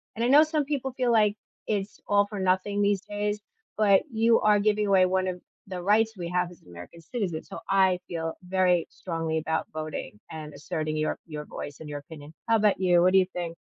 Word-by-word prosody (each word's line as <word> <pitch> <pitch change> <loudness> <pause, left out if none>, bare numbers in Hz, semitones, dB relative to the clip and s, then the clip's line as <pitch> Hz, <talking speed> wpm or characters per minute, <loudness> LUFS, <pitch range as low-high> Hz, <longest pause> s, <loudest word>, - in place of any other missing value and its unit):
and 230 - -2
I - - +3
know 290 +3 +8
some 310 -1 0
people 270 -2 -2
feel 250 -2 +1
like 210 -2 +4 0.3
it's 205 -1 -2
all 205 0 +4
for 205 -1 -6
nothing 190 +2 +1
these 200 -1 +2
days, 205 0 -3 0.4
but 200 -3 +5
you 230 +1 +4
are 210 -1 +4
giving 210 0 +1
away 190 -2 +5
one 185 0 +1
of 180 -1 -4 0.3
the 185 -2 -5
rights 215 +4 +3
we 175 -2 -4
have 180 0 0
as 175 - -16
an - - -24
American 90 - -11
citizen. 175 -5 -3
So, - - -9
I 190 -2 +4
feel 165 -1 -3
very 180 -2 +2
strongly 165 -3 -3
about 160 0 -1
voting 155 -8 -6
and 155 -2 -7
asserting 155 +2 -3
your 155 - -1
your 150 -2 -7
voice 145 -1 -7
and 160 - -9
your 145 0 -4
opinion. 150 0 -12 0.2
How 225 - +5
'bout 210 -2 +3
you? 175 -2 +4
What 185 +1 +4
do 190 - +7
you 185 - +3
think? 170 -2 -4
185 Hz, 220 wpm, -27 LUFS, 165-210 Hz, 0.4 s, know